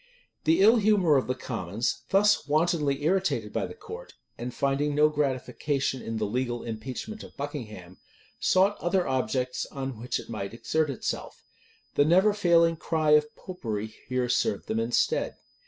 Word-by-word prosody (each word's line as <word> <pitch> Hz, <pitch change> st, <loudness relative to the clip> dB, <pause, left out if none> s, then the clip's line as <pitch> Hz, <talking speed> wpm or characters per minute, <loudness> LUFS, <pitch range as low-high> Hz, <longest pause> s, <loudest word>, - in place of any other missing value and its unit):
The 165 Hz, +4 st, +4 dB
ill 220 Hz, +4 st, +7 dB
humor 200 Hz, -7 st, +4 dB
of 135 Hz, -, +2 dB
the 130 Hz, -, -1 dB
commons, 115 Hz, -3 st, -3 dB
thus 205 Hz, -4 st, +3 dB
wantonly 150 Hz, -2 st, +1 dB
irritated 190 Hz, +4 st, 0 dB
by -, -, -1 dB
the -, -, -10 dB
court, 460 Hz, +2 st, -10 dB, 0.2 s
and 120 Hz, +1 st, -5 dB
finding 140 Hz, +4 st, 0 dB
no 150 Hz, +1 st, +5 dB
gratification 140 Hz, -1 st, -1 dB
in 115 Hz, 0 st, -4 dB
the 110 Hz, -, 0 dB
legal 120 Hz, +2 st, -2 dB
impeachment 125 Hz, -, -6 dB
of -, -, -13 dB
Buckingham, 110 Hz, -, -7 dB, 0.4 s
sought 195 Hz, +2 st, +3 dB
other 175 Hz, +1 st, +1 dB
objects 130 Hz, -1 st, -1 dB
on 135 Hz, -4 st, -5 dB
which 120 Hz, +2 st, -2 dB
it -, -, -10 dB
might 105 Hz, -1 st, -5 dB
exert 155 Hz, +5 st, 0 dB
itself. 135 Hz, -, -4 dB, 0.5 s
The 145 Hz, -, +4 dB
never 190 Hz, +6 st, +5 dB
failing 170 Hz, -4 st, +3 dB
cry 155 Hz, -1 st, 0 dB
of 150 Hz, 0 st, +4 dB
Popery 110 Hz, -, -5 dB
here 125 Hz, -1 st, 0 dB
served 120 Hz, -4 st, 0 dB
them 110 Hz, -, -1 dB
in 115 Hz, +1 st, -2 dB
stead. -, -, +1 dB
140 Hz, 160 wpm, -27 LUFS, 120-170 Hz, 0.5 s, ill